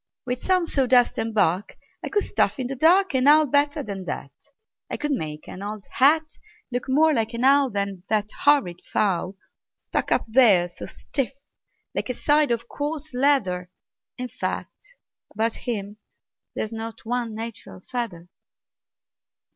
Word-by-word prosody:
"With 250 0 -3
some 370 -2 +2
sawdust 255 -5 +3
and 225 0 -1
bark 195 -2 +1 0.3
I - - -3
could 415 - +1
stuff - - +1
in 260 - -3
the 270 +2 -3
dark 350 +7 +4
An 260 +1 +2
owl 305 +1 +7
better 285 +1 +1
than 195 -3 -6
that. - - -5 0.6
I - - -3
could 295 0 -2
make 155 - -4
an 185 - -8
old 205 0 -6
hat 310 +4 +4 0.5
Look 245 +1 -3
more 310 +4 +4
like 225 -3 -1
an 235 - -2
owl 275 0 +5
Than 200 -3 -3
that 210 -1 0
horrid 270 -12 +3
fowl, 190 -2 0 0.4
Stuck - - -3
up - - +2
there 220 -7 +5
so - - -9
stiff 275 -1 -3 0.6
like - - -3
a 250 - -2
side 295 +2 +3
of 235 0 -1
coarse 295 +1 -5
leather. 245 -10 +1 0.5
In 250 - -4
fact, - - -6 0.4
about 225 +2 +1
him 205 -3 -4 0.6
there's 220 +1 -3
not 225 0 -7
one 235 -1 -2
natural 225 -3 -7
feather." 195 -6 -5
245 Hz, 155 wpm, -24 LUFS, 205-285 Hz, 0.6 s, owl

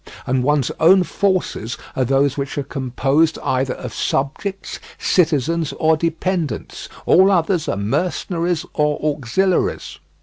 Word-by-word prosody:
And 130 0 +1
one's 145 0 +1
own 180 +4 +6
forces 185 - -1 0.2
are 130 - +1
those 135 +2 +2
which 140 0 -4
are 145 - -1
composed 135 +4 0
either 130 0 0
of 125 -3 -7
subjects, 190 +8 -3 0.2
citizens, 160 -2 +1
or 160 0 +3
dependents; 165 - -3 0.2
all 190 +2 +5
others 175 -2 +1
are - - -1
mercenaries 170 - -1
or 150 -1 +1
auxiliaries. 155 - -1
155 Hz, 125 wpm, -20 LUFS, 135-180 Hz, 0.2 s, own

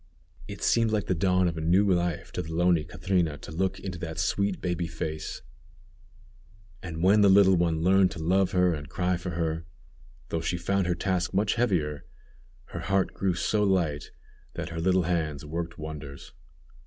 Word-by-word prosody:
It 100 - -8
seemed 115 -1 +3
like 105 -2 0
the - - 0
dawn 90 +1 +2
of 80 -1 -3
a - - -4
new 90 +6 +3
life 85 -2 -2
to - - -3
the 80 -2 -8
lonely 85 -1 +2
Catrina 85 -4 -1
to 70 - -10
look 95 +4 -1
into 90 -3 -6
that 80 -2 -6
sweet 100 +4 0
baby 90 -2 -2
face, 80 -1 -5 1.4
and 80 -2 -5
when 100 +3 +5
the 100 - +6
little 95 -1 +6
one 85 -2 +1
learned 95 +1 +5
to - - -9
love 95 +3 +2
her 90 -1 +3
and 75 -3 -6
cry 90 +1 0
for 90 +1 -5
her, 80 -1 -1 0.7
though 80 - -2
she 90 +2 -1
found 95 +2 0
her 90 - +1
task 90 0 -1
much 100 +1 +2
heavier, 85 -11 0 0.7
her - - -6
heart 95 -1 0
grew 95 -3 0
so 105 +5 +1
light 85 -7 0 0.5
that - - -4
her 80 -1 -5
little 95 +1 +3
hands 80 -4 -2
worked 85 +2 -5
wonders. 75 -3 -8
90 Hz, 180 wpm, -27 LUFS, 80-95 Hz, 1.4 s, the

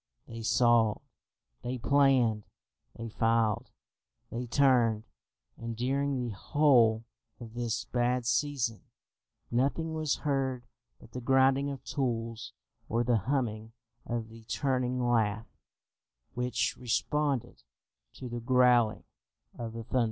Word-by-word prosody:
They 115 0 -7
sawed, 115 -1 +3 0.6
they 125 +1 -3
planed, 125 -5 +3 0.5
they 115 - -5
filed, 115 -1 +1 0.6
they 120 +1 -4
turned: 120 -4 +3 0.5
and 115 -1 -6
during 140 +3 0
the 120 -3 -3
whole 120 -3 +3 0.4
of 115 -2 -10
this 120 -1 -2
bad 125 0 0
season, 125 -4 0 0.7
nothing 140 +6 0
was 155 -2 0
heard 135 -3 0 0.4
but - - -16
the 125 - -6
grinding 135 +2 +3
of 140 -2 -7
tools 115 -4 -3 0.4
or 115 +2 +1
the 120 -1 +2
humming 115 -5 -1 0.3
of 115 -2 -3
the 115 0 -13
turning 125 +2 -1
lathe 115 -3 +1 0.9
which 125 -1 -1
responded 140 +2 -1 0.5
to 130 - -8
the 120 0 -4
growling 125 -2 +3 0.5
of 115 -1 -6
the 115 0 -6
thunder. 125 +3 -1
120 Hz, 115 wpm, -30 LUFS, 115-130 Hz, 0.9 s, sawed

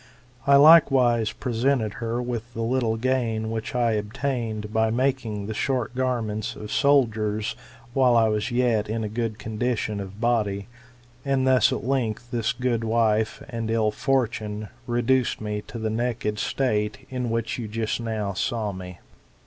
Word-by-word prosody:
I 140 - +7
likewise 135 -7 +6
presented 120 -3 0
her 115 +2 -1
with 120 -1 -5
the 115 - -2
little 115 -1 0
gain 115 -3 0
which 115 +2 -4
I 120 -2 +2
obtained 110 0 -3
by 110 0 +2
making 115 -4 -1
the 110 - -4
short 125 0 -1
garments 115 -4 -2
of 105 0 -8
soldiers 110 -7 +2 0.4
while 125 -2 +4
I 115 -1 +5
was 105 -1 0
yet 120 -4 +1
in 110 +1 -2
a - - -1
good 110 0 -3
condition 110 -1 -2
of 100 +1 -8
body; 105 -4 0 0.6
and 135 -1 +1
thus 130 -4 +4
at - - -2
length 120 -2 -1
this 115 -3 0
good 125 -3 -1
wife, 110 -1 +1
and 115 -4 -4
ill 110 -1 +2
fortune, 110 -4 -1 0.2
reduced 120 +1 +1
me 105 -1 -3
to - - -7
that 110 -1 -2
state 125 0 -1
in 125 -2 -2
which 115 +1 -2
you 115 - -4
just 110 +1 -2
now 110 -3 -2
saw 110 -1 -1
me. 90 -1 -8
115 Hz, 155 wpm, -25 LUFS, 110-125 Hz, 0.6 s, I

